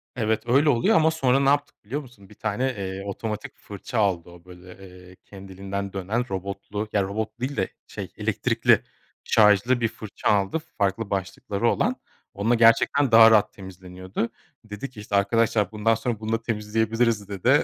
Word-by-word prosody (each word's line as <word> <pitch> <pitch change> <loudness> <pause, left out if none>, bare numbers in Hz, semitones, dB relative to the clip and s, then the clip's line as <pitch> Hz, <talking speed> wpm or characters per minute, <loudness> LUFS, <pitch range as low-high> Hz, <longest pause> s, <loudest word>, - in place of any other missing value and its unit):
Evet, 110 -2 0
öyle 140 +5 +3
oluyor 120 +2 +3
ama, 160 0 +4
sonra 135 -4 +2
ne 140 0 +3
yaptık 145 0 -1
biliyor 140 +7 -3
musun? 115 -8 -17
Bir 105 - -16
tane, 110 +3 -2
eee, 95 0 -5
otomatik 105 +2 -5
fırça 105 +3 -5
aldı 90 -4 0
o, 85 0 -16
böyle, 90 0 -13 0.3
ııı, 90 - -15
kendiliğinden 100 0 -7
dönen, 110 +6 -2
robotlu 100 +2 -5
ya 100 -2 +2
robotlu 105 +4 -4
değil 135 0 -3
de, 95 - +1 0.2
şey, - - -7
elektrikli, - - +2 0.4
şarjlı 110 +4 +4
bir 115 - +3
fırça 110 -1 -4
aldı, 100 +8 +1 0.2
farklı 100 +1 0
başlıkları 100 +3 -2
olan. 255 +3 +1 0.4
Onunla 110 +4 +1
gerçekten 115 +4 +4
daha 115 0 +9
rahat 105 -2 +4
temizleniyordu. 95 +2 -6 0.3
Dedi 105 +5 -7
ki 120 -5 -13
"İşte 105 -1 -4
arkadaşlar, 110 0 +2
bundan 110 +1 +1
sonra 115 -1 -3
bununla 110 +1 -2
temizleyebiliriz." 110 0 0
dedi. 120 - +2
105 Hz, 165 wpm, -24 LUFS, 100-115 Hz, 0.4 s, daha